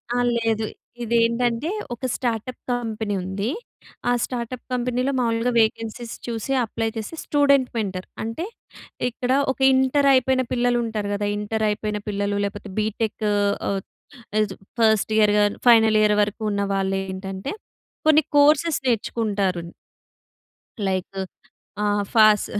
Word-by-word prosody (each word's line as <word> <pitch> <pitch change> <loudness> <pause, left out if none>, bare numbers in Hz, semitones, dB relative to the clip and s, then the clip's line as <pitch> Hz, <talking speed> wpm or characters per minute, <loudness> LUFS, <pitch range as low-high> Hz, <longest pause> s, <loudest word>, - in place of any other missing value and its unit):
ఆ! - - +1 0.2
లేదు. 225 -1 0 0.4
ఇదేంటంటే 235 +4 +1 0.2
ఒక 240 +2 -6
స్టార్టప్ 240 0 -3
కంపెనీ 220 -3 -2
ఉంది. 200 +4 -2 0.6
ఆ - - +4
స్టార్టప్ 245 0 -4
కంపెనీలో 250 +2 0
మామూలుగా 230 0 +1
వేకెన్సీస్ 225 +1 -1
చూసి, 230 +2 -3
అప్లై 225 0 -2
చేసి, 220 +8 -5
స్టూడెంట్ 280 -3 +3
మెంటర్. 190 -4 -3 0.2
అంటే 230 +11 -3 0.6
ఇక్కడ 245 +1 -3 0.2
ఒక 265 - -8
ఇంటర్ 265 +2 +3
అయిపోయిన 260 0 +3
పిల్లలు 245 -1 +2
ఉంటారు 210 -2 -3
గదా! 205 0 -1
ఇంటర్ 215 +1 -1
అయిపోయిన 210 0 -2
పిల్లలు 200 0 -1
లేకపోతే 200 0 -6
బీటెక్ 215 0 -2 0.4
ఆహ్, 195 -1 -1 0.7
చ - - -8 0.3
ఫస్ట్ 220 -1 +3
ఇయర్ 210 -1 +5
గాని 205 0 +2
ఫైనల్ 225 -2 +6
ఇయర్ 210 0 +4
వరకు 210 +2 -1
ఉన్న 200 0 -1
వాళ్ళు 195 0 0
ఏంటంటే 190 +4 -5 0.5
కొన్ని 310 0 +6
కోర్సెస్ 300 +2 +4
నేర్చుకుంటారు. 205 -6 0 1.3
లైక్ 190 +1 -2 0.7
ఆహ్, 205 0 +1
ఫాస్ 215 -2 +6
225 Hz, 125 wpm, -23 LUFS, 205-245 Hz, 1.3 s, ఫైనల్